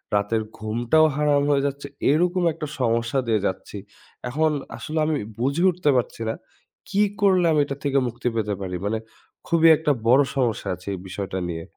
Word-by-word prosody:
রাতের 105 Hz, +2 st, +1 dB
ঘুমটাও 120 Hz, +8 st, +2 dB
হারাম 145 Hz, -1 st, +2 dB
হয়ে 140 Hz, -1 st, +2 dB
যাচ্ছে। 140 Hz, 0 st, -5 dB, 0.2 s
এরকম 175 Hz, +4 st, +2 dB
একটা 155 Hz, -1 st, -6 dB
সমস্যা 115 Hz, +1 st, +1 dB
দিয়ে 110 Hz, -2 st, +2 dB
যাচ্ছি। 95 Hz, +2 st, -4 dB, 0.5 s
এখন 155 Hz, +5 st, +2 dB, 0.3 s
আসলে 155 Hz, +1 st, -3 dB
আমি 155 Hz, 0 st, 0 dB, 0.2 s
বুঝে 140 Hz, +7 st, 0 dB
উঠতে 180 Hz, -4 st, 0 dB
পারছি 120 Hz, -1 st, -2 dB
না। -, -, 0 dB, 0.6 s
কি 200 Hz, +2 st, +1 dB, 0.2 s
করলে 185 Hz, -3 st, +4 dB
আমি 150 Hz, -2 st, +3 dB
এটা 140 Hz, -, -4 dB
থেকে 140 Hz, -1 st, +2 dB
মুক্তি 120 Hz, +1 st, -4 dB
পেতে 105 Hz, -2 st, -1 dB
পারি? 90 Hz, -1 st, -4 dB
মানে 110 Hz, +2 st, 0 dB, 0.5 s
খুবই 165 Hz, -1 st, +4 dB
একটা 150 Hz, -1 st, +1 dB, 0.2 s
বড়ো 135 Hz, +4 st, +6 dB
সমস্যা 120 Hz, -6 st, 0 dB
আছে 90 Hz, +2 st, -18 dB
এই 95 Hz, -, -5 dB
বিষয়টা 95 Hz, 0 st, -4 dB
নিয়ে। 80 Hz, -1 st, -4 dB
135 Hz, 175 wpm, -23 LUFS, 110-155 Hz, 0.6 s, বড়ো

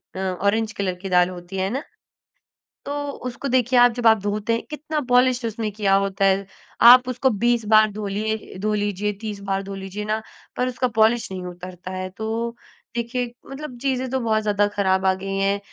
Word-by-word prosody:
अ, -, -, -5 dB, 0.3 s
orange 220 Hz, +2 st, +2 dB
colour 190 Hz, -2 st, -1 dB
की 195 Hz, -, -5 dB
दाल 180 Hz, -1 st, +4 dB
होती 180 Hz, +1 st, -8 dB
है, 190 Hz, -, 0 dB
है 190 Hz, -, 0 dB
ना? 275 Hz, +3 st, -2 dB, 1.0 s
तो 285 Hz, -, -3 dB, 0.4 s
उसको, 245 Hz, +3 st, -6 dB
देखिए, 250 Hz, -1 st, +3 dB
आप 245 Hz, 0 st, +7 dB
जब 240 Hz, 0 st, +1 dB
आप 220 Hz, -1 st, +6 dB
धोते 210 Hz, +2 st, -1 dB
हैं, 230 Hz, -, -1 dB
कितना 305 Hz, +1 st, -3 dB
पॉलिश 250 Hz, 0 st, +4 dB
उसने 225 Hz, -1 st, -3 dB
किया 200 Hz, -1 st, +2 dB
होता 195 Hz, 0 st, 0 dB
है। 195 Hz, 0 st, +2 dB, 0.5 s
आप 250 Hz, 0 st, +7 dB
उसको 255 Hz, +1 st, +1 dB
20 240 Hz, -2 st, +2 dB
बार 215 Hz, 0 st, +6 dB
धोलिये 210 Hz, +1 st, -3 dB
धो 215 Hz, +2 st, 0 dB
लीजिए, 205 Hz, 0 st, -1 dB
30 210 Hz, -2 st, -5 dB
बार 195 Hz, 0 st, 0 dB
धो 195 Hz, 0 st, -7 dB
लीजिए 195 Hz, +2 st, -6 dB
ना, 215 Hz, +1 st, -1 dB, 0.4 s
पर 250 Hz, -, +1 dB
उसका 255 Hz, 0 st, 0 dB
पॉलिश 225 Hz, -1 st, +3 dB
नहीं 185 Hz, -1 st, -5 dB
उतरता 180 Hz, +1 st, -8 dB
है। 185 Hz, 0 st, -4 dB
तो 225 Hz, +4 st, -3 dB, 0.4 s
देखिए, 240 Hz, +1 st, -2 dB, 0.2 s
मतलब 275 Hz, -2 st, -7 dB
चीज़ें 260 Hz, -1 st, -1 dB
तो 265 Hz, -, 0 dB
बहुत 220 Hz, -3 st, +1 dB
ज़्यादा 205 Hz, -1 st, +2 dB
खराब 190 Hz, -2 st, +1 dB
आ 190 Hz, -, +4 dB
गई 195 Hz, +1 st, -5 dB
हैं। 195 Hz, +1 st, +1 dB
215 Hz, 200 wpm, -23 LUFS, 195-240 Hz, 1.0 s, आप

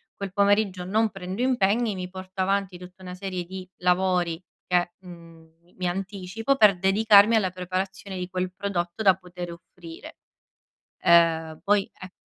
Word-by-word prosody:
quel 200 Hz, -1 st, -6 dB
pomeriggio 200 Hz, -2 st, +1 dB
non 215 Hz, +4 st, +1 dB
prendo 190 Hz, +2 st, -6 dB
impegni, 235 Hz, -3 st, +1 dB
mi 185 Hz, -1 st, -6 dB
porto 185 Hz, +1 st, -10 dB
avanti 195 Hz, -1 st, 0 dB
tutta 180 Hz, +1 st, -13 dB
una 180 Hz, 0 st, -7 dB
serie 185 Hz, -1 st, -4 dB
di 185 Hz, +1 st, -9 dB
lavori 180 Hz, -2 st, +1 dB, 0.2 s
che, 175 Hz, -1 st, +1 dB
mhmm, 165 Hz, -3 st, -15 dB
mi 175 Hz, +1 st, -28 dB
mi 185 Hz, -1 st, -2 dB
anticipo 195 Hz, +6 st, -2 dB
per 210 Hz, -7 st, +5 dB
dedicarmi 205 Hz, +3 st, +5 dB
alla 205 Hz, -4 st, +2 dB
preparazione 185 Hz, +2 st, -5 dB
di 180 Hz, 0 st, -5 dB
quel 185 Hz, -1 st, -3 dB
prodotto 185 Hz, 0 st, -3 dB
da 195 Hz, -2 st, +7 dB
poter 180 Hz, -2 st, -8 dB
offrire. 170 Hz, -1 st, -12 dB, 0.8 s
Ehm, 165 Hz, -2 st, +3 dB
poi 205 Hz, -1 st, +2 dB
e 185 Hz, 0 st, -10 dB
185 Hz, 150 wpm, -25 LUFS, 180-200 Hz, 0.8 s, da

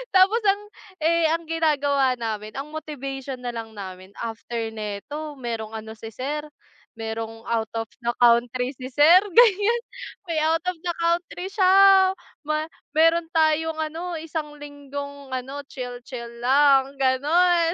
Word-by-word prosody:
Tapos 380 Hz, +4 st, +6 dB
ang 400 Hz, 0 st, +3 dB, 0.4 s
eh 335 Hz, +1 st, +3 dB
ang 330 Hz, -1 st, -4 dB
ginagawa 285 Hz, -5 st, +2 dB
namin, 215 Hz, -2 st, -4 dB
ang 275 Hz, +2 st, -5 dB
motivation 275 Hz, -4 st, -6 dB
na 245 Hz, -, -3 dB
lang 225 Hz, -1 st, -7 dB
namin 190 Hz, -1 st, -9 dB
after 230 Hz, 0 st, -4 dB
neto 220 Hz, +8 st, -6 dB
merong 230 Hz, -3 st, -5 dB
ano 220 Hz, 0 st, -7 dB
si 225 Hz, 0 st, -9 dB
sir, 295 Hz, +6 st, -4 dB, 0.5 s
merong 225 Hz, 0 st, -5 dB
out 225 Hz, -1 st, 0 dB
of 225 Hz, 0 st, -3 dB, 0.2 s
the 235 Hz, -, +1 dB
country 245 Hz, +1 st, +4 dB
si 255 Hz, -, -6 dB
sir, 305 Hz, +6 st, +7 dB, 0.2 s
ganiyan, 460 Hz, +1 st, +5 dB, 0.5 s
may 330 Hz, -, -1 dB
out 325 Hz, +1 st, +2 dB
of 365 Hz, -, -4 dB
the 345 Hz, -, 0 dB
country 345 Hz, +2 st, -1 dB
siya 385 Hz, -1 st, +6 dB, 0.3 s
ma 305 Hz, +1 st, -1 dB, 0.2 s
meron 330 Hz, +2 st, +4 dB
tayong 320 Hz, 0 st, +2 dB
ano 330 Hz, +3 st, -4 dB
isang 315 Hz, -2 st, -5 dB
linggong 285 Hz, -1 st, -8 dB
ano 270 Hz, +3 st, -5 dB
chill-chill 245 Hz, -2 st, -7 dB
lang 270 Hz, +1 st, +4 dB
ganon. 330 Hz, +6 st, +3 dB
285 Hz, 140 wpm, -24 LUFS, 235-330 Hz, 0.5 s, sir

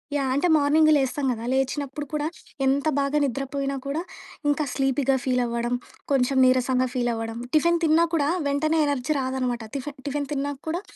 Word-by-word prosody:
Yeah. 270 Hz, -2 st, 0 dB
అంటే 285 Hz, +6 st, +2 dB
morning 305 Hz, +2 st, +4 dB
లేస్తాం 275 Hz, +1 st, 0 dB
కదా! 230 Hz, 0 st, -4 dB
లేచినప్పుడు 275 Hz, +2 st, -1 dB
కూడా, 300 Hz, -1 st, -1 dB, 0.4 s
ఎంత 280 Hz, +3 st, +2 dB
బాగా 280 Hz, +1 st, +1 dB
నిద్ర 275 Hz, 0 st, -1 dB
పోయినా 275 Hz, 0 st, -1 dB
కూడా, 290 Hz, +4 st, -2 dB, 0.5 s
ఇంకా 300 Hz, +1 st, +1 dB
స్లీపీగా 270 Hz, 0 st, +1 dB
ఫీల్ 250 Hz, -1 st, +1 dB
అవ్వడం, 235 Hz, +1 st, -2 dB, 0.4 s
కొంచెం 265 Hz, 0 st, +2 dB
నీరసంగా 255 Hz, 0 st, +2 dB
ఫీల్ 245 Hz, -1 st, 0 dB
అవ్వడం, 225 Hz, 0 st, -4 dB, 0.2 s
టిఫిన్ 340 Hz, +2 st, +3 dB
తిన్నా 325 Hz, +1 st, +4 dB
కూడా 290 Hz, -3 st, +2 dB, 0.2 s
వెంటనే 310 Hz, +3 st, +1 dB
ఎనర్జీ 285 Hz, +1 st, 0 dB
రాదనమాట. 255 Hz, -2 st, -2 dB
టిఫెన్ 280 Hz, +1 st, -5 dB
టిఫిన్ 285 Hz, 0 st, -2 dB
తిన్నాక 280 Hz, 0 st, -3 dB
కూడా 345 Hz, +4 st, -1 dB
275 Hz, 165 wpm, -25 LUFS, 255-290 Hz, 0.5 s, morning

